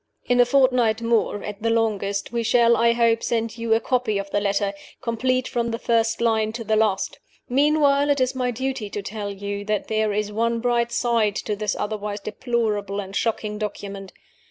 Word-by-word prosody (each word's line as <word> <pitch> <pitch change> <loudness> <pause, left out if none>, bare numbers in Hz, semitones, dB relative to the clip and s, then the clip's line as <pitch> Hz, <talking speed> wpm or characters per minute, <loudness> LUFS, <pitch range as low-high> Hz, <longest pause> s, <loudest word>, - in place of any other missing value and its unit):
In 245 0 +2
a 245 - +7
fortnight 245 -4 +3
more, 230 -3 +1
at 210 0 -7
the 230 - +1
longest, 205 -3 0
we 235 -1 -1
shall, 235 +1 +4
I 235 +1 +3
hope, 230 -1 +2
send 230 0 -2
you 230 -1 +2
a - - +2
copy 245 -3 0
of 200 0 -5
the 205 - +2
letter, 200 0 0 0.3
complete 255 +1 0
from 235 -2 -1
the 230 - -2
first 230 -1 +1
line 220 -2 +2
to 230 0 -5
the 220 0 +1
last. 210 -3 0 0.3
Meanwhile, 285 +1 +3
it 285 -1 +2
is 255 0 +1
my 255 -1 -1
duty 260 -2 -3
to 205 0 -5
tell 205 0 -5
you 200 +1 -5
that 210 0 -2
there 215 -1 +1
is 210 0 -1
one 230 +2 0
bright 235 0 +1
side 230 -4 +1
to 210 - -1
this 210 -1 -2
otherwise 210 -1 -3
deplorable 210 -2 -2
and 195 0 -6
shocking 210 -2 -1
document. 200 -2 -6
225 Hz, 195 wpm, -23 LUFS, 210-235 Hz, 0.3 s, a